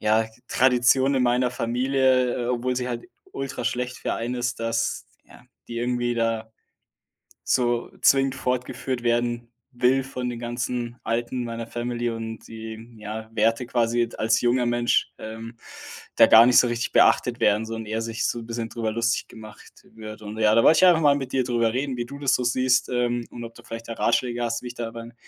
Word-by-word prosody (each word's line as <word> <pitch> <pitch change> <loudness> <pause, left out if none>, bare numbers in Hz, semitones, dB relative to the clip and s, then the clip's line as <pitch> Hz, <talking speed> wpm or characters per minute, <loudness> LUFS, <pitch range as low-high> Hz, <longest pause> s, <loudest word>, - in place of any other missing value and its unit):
ja, 110 +1 +2 0.2
Tradition 130 +2 +3
in 130 - +2
meiner 125 +1 +2
Familie, 125 0 +1
obwohl 125 +1 -1
sie 125 0 -2
halt 120 -1 -4 0.3
ultraschlecht 125 -2 -3
für - - -2
einen 120 +2 -3
ist, 125 0 -2
dass, 115 0 -1 0.2
ja, - - -17 0.2
die 115 - -6
irgendwie 120 0 -1
da, 115 -1 -1 0.9
so 120 -2 0
zwingend 135 -1 +4
fortgeführt 125 -1 -3
werden 120 0 0 0.3
will 130 +2 +2
von 125 -2 -4
den 120 - -5
ganzen 120 0 -4
Alten 120 +2 -2
meiner 115 0 -5
Family 120 0 -3
und 115 -1 -6
die, 110 +1 -9
ja, 110 +1 -7
Werte 115 +3 +1
quasi 120 -1 +1
d - - -12
als 110 0 +2
junger 120 0 +2
Mensch, 120 0 +1
ähm, 115 +1 -8 0.6
da - - +8
gar 115 +1 +8
nicht 125 - +5
so 125 - +3
richtig 120 0 -2
beachtet - - +4
werden 105 +1 +3
so 115 - -5
und 115 -1 -6
eher 110 +1 -3
sich 115 0 -3
so 120 - -2
‘n 115 - -9
bisschen 115 -1 -3
drüber 110 0 -3
lustig 115 +1 0
gemacht 110 -2 -14
wird. 110 -1 -9
Und 105 +1 -7
ja, 110 -1 +4
da 115 - +5
wollte 160 - +6
ich 185 - +6
einfach 170 -3 +5
mal 145 -2 +5
mit 135 -2 -4
dir 130 -1 +2
drüber 115 -2 +1
reden, 135 0 -2
wie 120 - -2
du 140 +3 -9
das 140 -2 +1
so 125 - -1
siehst, 130 +1 +2
ähm, 120 -1 -1
und 120 - -8
ob 115 - -11
du - - -15
vielleicht 115 0 -8
da 115 - -3
Ratschläge 120 +1 0
hast, 115 0 -2
wie - - -6
ich 120 - -7
da 115 -2 -4
beim 115 0 -9
120 Hz, 200 wpm, -24 LUFS, 115-125 Hz, 0.9 s, da